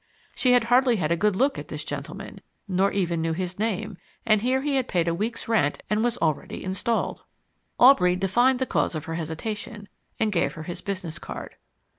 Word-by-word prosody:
She 250 -1 +3
had 245 - +5
hardly 245 +1 +4
had 165 -6 -1
a - - +4
good 210 +3 +1
look 270 +6 +1
at - - -8
this - - -5
gentleman, - - -7 0.3
nor 195 +1 +2
even 175 -4 0
knew 165 0 0
his 180 +2 -4
name, 215 -2 -2 0.3
and 215 -2 +4
here 255 +3 +1
he 290 -1 0
had 260 -1 0
paid 175 -2 0
a 170 - +2
week's 220 +7 -3
rent 210 -11 +1
and 210 +1 +2
was 240 0 +1
already 155 -3 -2
installed. 190 +5 -1 0.6
Aubrey 190 -9 +6
divined 240 +8 +3
the 260 - 0
cause 175 - 0
of 155 0 -4
her 165 - -4
hesitation, 205 +6 -5 0.3
and 220 -1 +1
gave 170 -7 +1
her 155 - -7
his 175 +2 -6
business 185 -5 -4
card. - - -8
200 Hz, 200 wpm, -25 LUFS, 170-235 Hz, 0.6 s, Aubrey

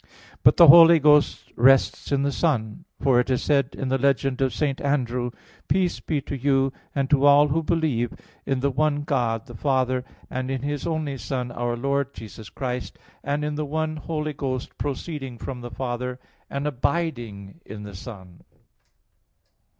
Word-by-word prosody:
But - - +5
the 170 - +9
Holy 165 +2 +9
Ghost 150 -1 +3
rests 135 +4 +3
in 140 -1 +2
the 140 - 0
Son; 115 -10 -1
for 130 -2 +3
it 125 - 0
is 130 -2 0
said 140 -2 +1
in 135 - -3
the 135 +1 +1
legend 135 0 +1
of 135 -1 +2
St. 140 -3 -2
Andrew: 125 -4 -1 0.4
"Peace 185 -2 +1
be 155 -3 -2
to 140 - -6
you 135 0 +1 0.2
and 140 -1 0
to 140 -2 +4
all 145 +1 +6
who 160 +3 +1
believe 150 -8 0 0.3
in 135 -2 -1
the 140 +1 +1
one 145 +1 0
God 120 -6 -1
the 120 - -12
Father, 130 0 0 0.2
and 130 0 -4
in 135 -1 -3
His 145 0 -3
only 155 -4 -2
Son 125 +2 -3
our 120 0 -2
Lord 140 +2 -1
Jesus 110 -1 -10
Christ, 125 -2 -5 0.3
and 145 +1 -1
in 150 - -2
the 150 +1 -2
one 155 +1 -2
Holy 155 -1 -3
Ghost 130 -3 -4
proceeding 140 -2 -4
from 125 +1 -6
the 120 - -7
Father, 125 0 -4 0.3
and 140 +1 -3
abiding 125 - -3
in 105 -1 -9
the 100 -1 -9
Son." 95 -3 -11
135 Hz, 175 wpm, -24 LUFS, 125-145 Hz, 0.4 s, the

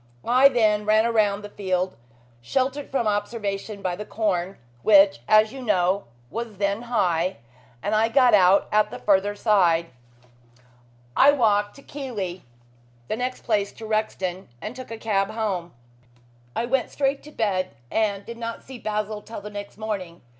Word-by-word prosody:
I 255 +3 +6
then 215 -5 +2
ran 215 +1 +4
round 205 -2 +2
the 205 - -7
field, 185 -2 -2 0.5
sheltered 265 - -1
from 265 -4 0
observation 205 -1 -3
by 180 -2 -1
the 210 - -6
corn, 195 -4 -1 0.2
which, 195 - +6
as 215 +2 +5
you 270 - -7
know, 195 -3 +1 0.3
was 230 -3 -5
then 200 +2 0
high, 185 -7 0 0.5
and 210 - -1
I 220 +1 +3
got 250 0 +5
out 190 -1 +5
at 215 0 +3
the - - -7
further 205 0 +2
side. 175 -6 +2 1.2
I 285 - +7
walked 210 -6 +2
to 275 - -15
Keighley, 210 -11 -5 0.7
the - - 0
next 250 +2 -4
place 205 -4 0
to 225 - -10
Rexton, 195 -4 -2
and 215 - -6
took 255 0 -9
a 225 - -6
cab 200 -3 0
home. 195 -6 -3 0.8
I 235 - 0
went 255 +1 0
straight 275 0 0
to 300 - -11
bed, 185 - -1 0.2
and 200 -2 0
did 235 0 -8
not 230 -1 -5
see 260 -2 -10
Basil 210 0 -3
till 225 -1 -8
the 210 +1 -8
next 205 0 -8
morning. 200 -6 -5
210 Hz, 160 wpm, -24 LUFS, 195-230 Hz, 1.2 s, I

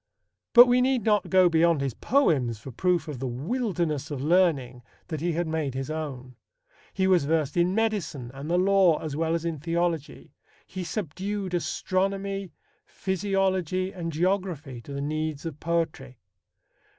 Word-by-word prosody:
But 245 +1 +11
we 245 0 +3
need 255 -3 +2
not 210 -1 +2
go 185 -1 +6
beyond 165 -2 +3
his 135 -3 -1
poems 140 - +1
for 130 +5 -10
proof 175 +4 0
of 145 -5 -6
the 130 - -3
wilderness 160 - -2
of 145 -3 -4
learning 145 -6 +2 0.3
that 155 -3 -4
he 175 0 0
had 175 +2 -1
made 160 -4 -2
his 135 +2 -3
own. 135 -5 -6 0.6
He 190 - 0
was 185 -6 +3
versed 155 -2 0
in 175 +2 +2
medicine 200 - -1
and 140 +3 -7
the 175 - +2
law 185 -3 +4
as 155 -3 -5
well 165 +1 0
as 170 0 -3
in 165 -3 -2
theology. 165 -1 -2 0.3
He 185 -1 -6
subdued 190 +2 -4
astronomy, 195 +1 -1 0.3
physiology, 190 -1 -1
and 170 -3 -4
geography 165 -6 -1
to 140 - -11
the 140 0 -4
needs 155 +1 -3
of 155 -3 -6
poetry. 155 -6 -2
170 Hz, 160 wpm, -26 LUFS, 145-190 Hz, 0.6 s, But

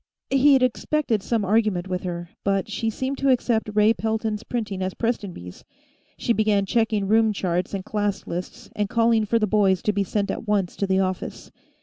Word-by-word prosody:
He'd 270 -1 +5
expected 255 -2 0
some 220 0 -1
argument 205 -3 +1
with 180 -1 -2
her, 175 -1 -5
but 195 -1 0
she 225 +1 -1
seemed 260 +5 -3
to 275 - +2
accept 235 -4 +1
Ray 210 +1 +4
Pelton's 220 -1 -2
printing 215 -5 -4
as 185 0 -2
Prestonby's; 195 - -4 0.5
she 235 - +1
began 210 -3 +2
checking 220 -1 +1
room 220 +1 +4
charts 180 -1 -1
and 190 0 -5
class 205 -2 -2
lists, 180 +1 -6
and 205 -1 -1
calling 230 -1 +3
for 230 +3 +2
the 220 - +2
boys 195 -3 +2
to 210 - +1
be 200 0 +1
sent 200 +1 -1
at 225 - -6
once 200 -4 0
to 200 - -1
the 190 0 +2
office. 185 -2 -3
210 Hz, 190 wpm, -24 LUFS, 190-225 Hz, 0.5 s, He'd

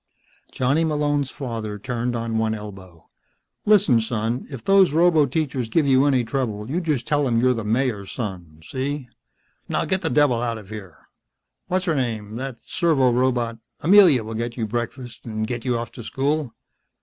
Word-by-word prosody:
Johnny 135 +6 +1
Malone's 145 -3 0
father 115 -7 -5
turned 120 +3 -3
on 115 -1 -1
one 110 0 0
elbow. 95 -6 -11 0.6
"Listen, 200 - +5
son," 115 +1 -1
he - - -13
said. 135 - -7
"If 115 - -10
those 195 -5 +5
roboteachers 150 -6 +2
give 155 +4 +2
you 135 +1 +4
any 130 -3 +3
trouble 115 -4 -3
you 175 +4 0
just 150 -8 -1
tell 145 -1 +1
them 115 -3 +2
you're 125 +1 +4
the 115 -2 -4
Mayor's 110 -2 -1
son. 90 -9 -6
See. 135 0 -4 0.6
Now - - 0
get 190 0 0
the - - -1
devil 140 -6 +3
out 115 -2 -1
of 105 -3 -12
here. 100 -6 -9 0.7
What's 185 +1 0
her 165 - +1
name 110 -6 -2
that 130 -2 -6
servorobot 125 -7 +1 0.2
Amelia 175 - +6
will 110 +1 -6
get 115 +2 -4
your 115 - -1
breakfast 120 +2 -5
and 110 -1 -2
get 120 +1 -4
you 125 -2 +1
off 115 0 -5
to 120 - -9
school. 140 +2 -1
125 Hz, 175 wpm, -23 LUFS, 110-145 Hz, 0.7 s, Amelia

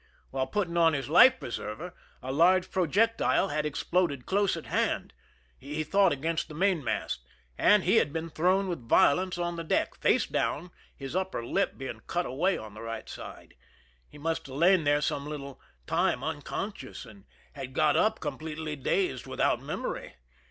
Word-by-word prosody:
While 130 0 -1
putting 170 +2 -1
on 165 -1 +5
his 140 -1 -3
life 260 - +7
preserver 120 +9 -6 0.3
a 130 - -3
large 180 +5 +4
projectile 195 +3 +2
had 150 0 -1
exploded 150 -2 0
close 200 0 +1
at - - -8
hand,— - - -1 0.5
he 150 +3 -4
thought 195 +5 +3
against 160 +4 -1
the 155 - -10
mainmast, 165 - 0 0.2
— - - -38
and 210 -2 +5
he 195 +6 +3
had 145 - +3
been 165 +1 -4
thrown 185 +5 +2
with 145 -11 -5
violence 180 +5 +4
on 175 -1 -2
the 165 - -4
deck, 160 - 0
face - - +2
down, 170 +4 -2 0.2
his 135 +3 -7
upper 185 -10 -2
lip 195 +11 0
being 135 -1 -6
cut 175 0 -1
away 175 +10 0
on 110 -2 -9
the 110 - -10
right 115 -1 -6
side. - - -10 0.6
He - - -14
must 160 +1 -2
have 135 - -9
lain 170 +2 +4
there 145 0 +3
some 145 0 -2
little 140 -3 -7 0.2
time 165 -5 +1
unconscious, 155 0 -5
and 100 -4 -15 0.3
had 135 -2 -7
got 150 -1 +3
up 215 - +2
completely 155 -1 -5
dazed, 135 -1 -1
without - - +1
memory. - - -5
160 Hz, 175 wpm, -29 LUFS, 140-185 Hz, 0.6 s, life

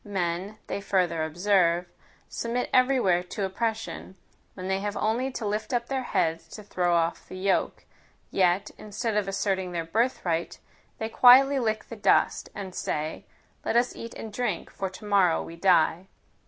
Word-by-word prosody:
Men, 190 0 -3
they 200 - -4
further 180 -5 +1
observe, 175 +1 +2 0.4
submit 240 +1 -3
every 255 +1 +4
where 180 -6 +3
to 180 +2 -4
oppression, 220 0 -3 0.4
when 185 -1 -6
they 190 0 0
have 205 +1 -3
only 235 +5 0
to 230 - -4
lift 210 +5 -2
up 235 0 -2
their 270 -1 -1
heads 165 -9 -1
to 210 - -9
throw 180 -3 0
off 170 0 0
the 185 - -7
yoke; 190 +1 0 0.5
yet, 185 +2 +2
instead 215 +1 -3
of 210 -2 +1
asserting 195 -2 -1
their 165 -1 -2
birthright, 175 -4 -1 0.4
they 220 - -3
quietly 265 +4 +7
lick 220 -3 -1
the 230 - -6
dust, 205 - +2
and 195 -3 -6
say, 155 -2 -3 0.4
let - - -1
us 240 +1 +1
eat 230 - -8
and 220 -2 -8
drink, 215 -7 -2
for 195 - -4
to 185 +3 -12
morrow 195 -5 +3
we 165 - -9
die. 175 0 +3
195 Hz, 165 wpm, -27 LUFS, 180-225 Hz, 0.5 s, quietly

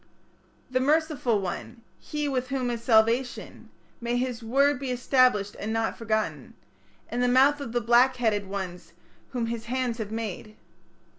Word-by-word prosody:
"The 255 - +2
merciful 290 -5 +1
one", 195 +5 -6 0.2
"he 300 -1 -3
with 260 -2 -1
whom 255 -2 -1
is 235 -1 -4
salvation", 235 +2 +1 0.3
May 240 +1 -1
his 250 -1 -2
word 275 +4 +2
be 270 -2 -4
established, 250 -4 +2
and 215 - -3
not 225 0 -1
forgotten, 220 -1 -2 0.6
In 240 - -2
the 250 - +3
mouth 270 +4 +4
of 240 - -5
the 240 +1 0
black 240 +3 +4
headed 215 -5 0
ones 180 -3 -6 0.4
whom 245 -3 -2
his 230 0 -4
hands 245 -1 -2
have 215 -2 -4
made. 215 -1 -5
240 Hz, 155 wpm, -26 LUFS, 220-255 Hz, 0.6 s, mouth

